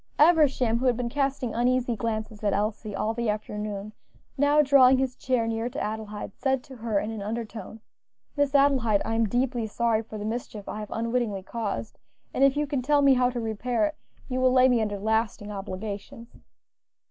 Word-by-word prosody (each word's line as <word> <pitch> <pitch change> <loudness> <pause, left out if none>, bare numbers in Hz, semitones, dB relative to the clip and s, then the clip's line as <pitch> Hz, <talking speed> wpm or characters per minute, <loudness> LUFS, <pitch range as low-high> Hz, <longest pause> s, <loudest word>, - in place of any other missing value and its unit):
Eversham, 290 -7 +4
who 260 - 0
had 245 -2 +2
been 245 -1 -2
casting 270 -3 -1
uneasy 245 0 +1
glances 215 0 -4
at 205 -2 +2
Elsie 210 0 -2
all 215 +3 -1
the 235 -1 -1
afternoon, 210 0 -4 0.4
now 285 +2 +3
drawing 265 -2 +6
his 260 -1 -1
chair 255 -3 0
near 225 +1 -2
to - - -6
Adelaide, 215 -1 -4
said 265 -2 0
to 265 -4 -12
her 220 -3 0
in 215 - -3
an 220 -2 -5
undertone, 220 0 -6 0.5
"Miss 285 -1 +1
Adelaide, 260 -7 +3
I - - -2
am 225 -1 +1
deeply 245 -1 0
sorry 225 0 +1
for 220 -1 -9
the 210 - -5
mischief 220 -2 -5
I 215 - -5
have 210 - -6
unwittingly 230 -4 -1
caused, 220 +1 -4 0.3
and 270 - +2
if 275 +1 +4
you 295 - +1
can 280 -2 -2
tell 290 +2 +3
me 275 -1 +7
how 250 -1 +3
to 245 -1 -4
repair 230 +5 -1
it 305 0 -3 0.3
you 255 -1 -2
will 255 0 +4
lay 255 0 +6
me 245 -3 +3
under 205 -2 -2
lasting 215 0 -1
obligations." 200 +3 -7
230 Hz, 195 wpm, -26 LUFS, 215-255 Hz, 0.5 s, me